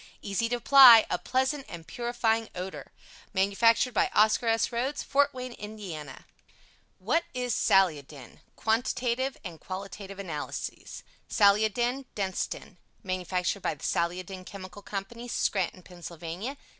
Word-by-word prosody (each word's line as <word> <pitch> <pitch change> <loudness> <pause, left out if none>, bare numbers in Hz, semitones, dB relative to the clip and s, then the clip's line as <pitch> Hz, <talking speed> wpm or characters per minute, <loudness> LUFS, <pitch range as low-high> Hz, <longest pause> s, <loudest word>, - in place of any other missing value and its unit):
Easy 210 +3 -1
to 245 - +1
apply, 245 -2 +9
a - - 0
pleasant 265 +2 0
and 170 -2 -9
purifying 235 -1 -1
odor. 185 +1 -7 0.4
Manufactured 230 +6 +3
by - - +2
OSCAR 220 +3 +4
S. 225 0 +2
RHOADS. 255 +5 -2
FORT 285 0 +2
WAYNE, 255 -2 -7
IND. 190 - -8 0.7
What 245 - +1
is 250 -2 -1
SALIODIN? 150 -11 +1 0.2
Quantitative 245 +3 0
and 170 -5 -8
Qualitative 195 +1 -7
Analyses 170 -7 -6 0.3
SALIODIN 220 +5 +2
DENSTEN 190 -2 -4 0.2
Manufactured 185 0 -2
by - - -1
the 140 - -17
Saliodin 180 +2 -2
Chemical 195 +1 -10
Co. 200 -1 -4 0.2
SCRANTON. 185 -5 -1
PA. 175 - -7
205 Hz, 120 wpm, -28 LUFS, 185-240 Hz, 0.7 s, apply